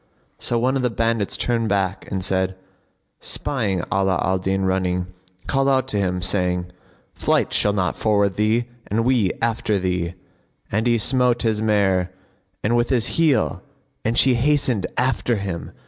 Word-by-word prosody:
So 120 Hz, -, 0 dB
one 130 Hz, +3 st, +1 dB
of 135 Hz, -, 0 dB
the 125 Hz, -, +1 dB
bandits 115 Hz, -2 st, -1 dB
turned 115 Hz, -2 st, 0 dB
back 95 Hz, -1 st, -1 dB
and, 95 Hz, -1 st, -2 dB, 1.0 s
spying 100 Hz, -10 st, -2 dB
Ala 95 Hz, -3 st, +1 dB
al 95 Hz, +1 st, +1 dB
Din 95 Hz, +1 st, -1 dB
running, 90 Hz, -1 st, -1 dB, 0.3 s
called 135 Hz, 0 st, +1 dB
out 130 Hz, -2 st, +2 dB
to 105 Hz, -, -1 dB
him, 90 Hz, -2 st, -1 dB
saying, 90 Hz, -2 st, 0 dB, 0.4 s
"Flight -, -, 0 dB
shall 105 Hz, -, +3 dB
not 95 Hz, -3 st, 0 dB
forward 100 Hz, -3 st, +1 dB
thee 110 Hz, +3 st, +1 dB, 0.2 s
and 115 Hz, +3 st, 0 dB
we 120 Hz, -7 st, +2 dB
after 110 Hz, -2 st, 0 dB
thee;" 90 Hz, -2 st, -2 dB, 0.6 s
and 110 Hz, +4 st, 0 dB
he 120 Hz, -1 st, +3 dB
smote 125 Hz, +1 st, +2 dB
his 110 Hz, -2 st, 0 dB
mare 100 Hz, -4 st, +2 dB, 0.6 s
with 120 Hz, +1 st, +1 dB
his 125 Hz, -4 st, +1 dB
heel 155 Hz, -5 st, +2 dB, 0.4 s
and 115 Hz, +2 st, 0 dB
she 130 Hz, -1 st, +6 dB
hastened 125 Hz, -5 st, +1 dB
after 125 Hz, -1 st, +1 dB
him. 95 Hz, -5 st, -5 dB
105 Hz, 150 wpm, -22 LUFS, 95-120 Hz, 1.0 s, she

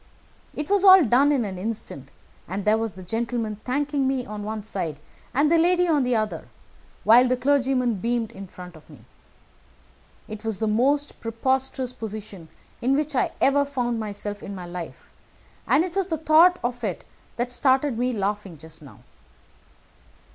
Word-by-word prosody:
It 300 Hz, -, -4 dB
was 400 Hz, -1 st, +2 dB
all 380 Hz, -2 st, +9 dB
done 260 Hz, +5 st, +4 dB
in 265 Hz, -6 st, +1 dB
an 190 Hz, -3 st, -6 dB
instant, 185 Hz, -, -6 dB, 0.4 s
and 190 Hz, +3 st, -4 dB
there 215 Hz, +1 st, +3 dB
was 225 Hz, -3 st, -3 dB
the 185 Hz, -, -10 dB
gentleman 225 Hz, +1 st, -3 dB
thanking 280 Hz, +4 st, -1 dB
me 265 Hz, -2 st, -1 dB
on 210 Hz, 0 st, -7 dB
the 205 Hz, -, -6 dB
one 215 Hz, -1 st, -4 dB
side 180 Hz, -8 st, -4 dB, 0.3 s
and 290 Hz, +4 st, +2 dB
the 335 Hz, -, +5 dB
lady 355 Hz, +1 st, +3 dB
on 305 Hz, -4 st, +3 dB
the 250 Hz, -1 st, +1 dB
other, 215 Hz, -1 st, -2 dB, 0.6 s
while 240 Hz, +3 st, +6 dB
the 255 Hz, 0 st, +1 dB
clergyman 260 Hz, -2 st, +1 dB
beamed 230 Hz, +2 st, -1 dB
on -, -, -19 dB
me -, -, -15 dB
in 195 Hz, -, -7 dB
front. 180 Hz, -1 st, -11 dB, 1.5 s
It 215 Hz, 0 st, -8 dB
was 220 Hz, -3 st, -2 dB
the 220 Hz, -, -1 dB
most 270 Hz, +7 st, +1 dB
preposterous 260 Hz, +2 st, -1 dB
position 210 Hz, -7 st, -8 dB, 0.3 s
in 260 Hz, +3 st, +2 dB
which 300 Hz, 0 st, -1 dB
I -, -, +2 dB
ever 285 Hz, +1 st, +4 dB
found 245 Hz, -5 st, -2 dB
myself 205 Hz, -1 st, -5 dB
in 200 Hz, -, -7 dB
my 180 Hz, -2 st, -7 dB
life, 175 Hz, -1 st, -8 dB, 0.6 s
and 295 Hz, -, +4 dB
it 360 Hz, -1 st, -8 dB
was 390 Hz, -1 st, 0 dB
the 320 Hz, -, -1 dB
thought 320 Hz, +4 st, +5 dB
of 245 Hz, 0 st, -3 dB
it 195 Hz, -6 st, -3 dB, 0.3 s
that 240 Hz, +1 st, -2 dB
started 260 Hz, 0 st, +2 dB
me 250 Hz, +1 st, +1 dB
laughing 205 Hz, -4 st, -3 dB
just 160 Hz, +1 st, -12 dB
now. 130 Hz, -9 st, -15 dB
240 Hz, 175 wpm, -24 LUFS, 205-275 Hz, 1.5 s, all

